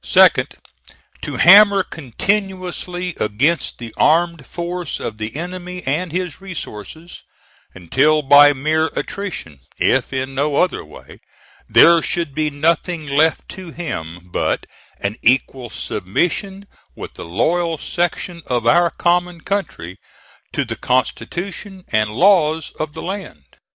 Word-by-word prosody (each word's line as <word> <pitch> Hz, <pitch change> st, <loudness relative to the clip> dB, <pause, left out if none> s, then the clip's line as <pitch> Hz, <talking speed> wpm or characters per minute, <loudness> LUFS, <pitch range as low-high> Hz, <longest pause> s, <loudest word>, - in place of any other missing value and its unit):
Second, -, -, +4 dB, 0.7 s
to -, -, -5 dB
hammer 200 Hz, +2 st, +7 dB
continuously 180 Hz, -, -3 dB
against 135 Hz, +11 st, 0 dB
the 115 Hz, -2 st, -9 dB
armed 165 Hz, -3 st, +2 dB
force 175 Hz, -1 st, -4 dB
of 110 Hz, -1 st, -6 dB
the 110 Hz, +2 st, -5 dB
enemy 180 Hz, +2 st, -6 dB
and 155 Hz, +6 st, -1 dB
his 180 Hz, -1 st, -4 dB
resources, 170 Hz, -, -8 dB, 0.5 s
until 150 Hz, -, +2 dB
by 145 Hz, +1 st, +8 dB
mere 155 Hz, +3 st, 0 dB
attrition, 175 Hz, -, -5 dB, 0.2 s
if -, -, +1 dB
in 130 Hz, 0 st, -3 dB
no 140 Hz, +2 st, 0 dB
other 180 Hz, -, +1 dB
way, -, -, -14 dB, 0.5 s
there 170 Hz, 0 st, +7 dB
should 165 Hz, -4 st, -2 dB
be 155 Hz, +1 st, 0 dB
nothing 160 Hz, +2 st, 0 dB
left 150 Hz, +3 st, +2 dB
to 185 Hz, -2 st, -8 dB
him 85 Hz, -, -6 dB
but -, -, -1 dB, 0.3 s
an 100 Hz, +3 st, -3 dB
equal 125 Hz, 0 st, +1 dB
submission 190 Hz, -, -2 dB, 0.3 s
with -, -, -8 dB
the -, -, -9 dB
loyal 165 Hz, -, 0 dB
section 175 Hz, +1 st, -3 dB
of 120 Hz, -2 st, -1 dB
our 170 Hz, +8 st, +4 dB
common 175 Hz, 0 st, 0 dB
country 140 Hz, -, -4 dB, 0.5 s
to -, -, -1 dB
the -, -, -5 dB
constitution 185 Hz, +9 st, -3 dB
and 110 Hz, -1 st, +1 dB
laws 160 Hz, -, +3 dB
of 155 Hz, -1 st, -3 dB
the 160 Hz, -, -8 dB
land. 185 Hz, -, -6 dB
160 Hz, 125 wpm, -19 LUFS, 135-180 Hz, 0.7 s, by